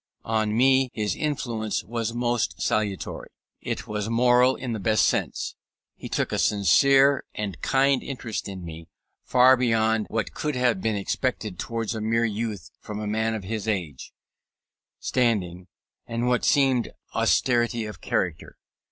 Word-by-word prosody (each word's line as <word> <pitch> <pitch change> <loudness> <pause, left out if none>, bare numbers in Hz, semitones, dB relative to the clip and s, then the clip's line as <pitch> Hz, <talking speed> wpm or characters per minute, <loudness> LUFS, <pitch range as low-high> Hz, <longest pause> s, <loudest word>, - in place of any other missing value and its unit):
On 110 -1 0
me 130 +1 +4
his 105 -2 -1
influence 120 -8 -2
was 115 0 -3
most 120 -1 -1
salutary. 105 -3 -2 0.3
It - - -4
was 105 0 -3
moral 125 +2 +4
in 125 -3 -4
the 110 - -3
best 110 +2 +3
sense. - - -1 0.4
He - - -9
took - - -1
a - - -1
sincere 135 - +4
and 100 -6 -4
kind 135 0 +2
interest 120 -5 -5
in 95 -3 -7
me, 80 0 -9 0.4
far 130 +1 +6
beyond 110 -3 +1
what 110 -1 -2
could 150 -2 -2
have 125 -6 +1
been 110 0 0
expected 105 -1 -2
towards 115 -1 -3
a 110 - -4
mere 115 +2 +1
youth 110 -1 -4
from 105 0 -7
a 105 - -4
man 110 +2 0
of 105 - -5
his 110 +2 -4
age, 85 -11 -3 0.9
standing, 95 -8 0 0.4
and 115 +1 -2
what 125 -1 +1
seemed 135 -4 +3 0.2
austerity 120 -2 +2
of 105 -6 -9
character. - - -2
115 Hz, 150 wpm, -25 LUFS, 105-125 Hz, 0.9 s, far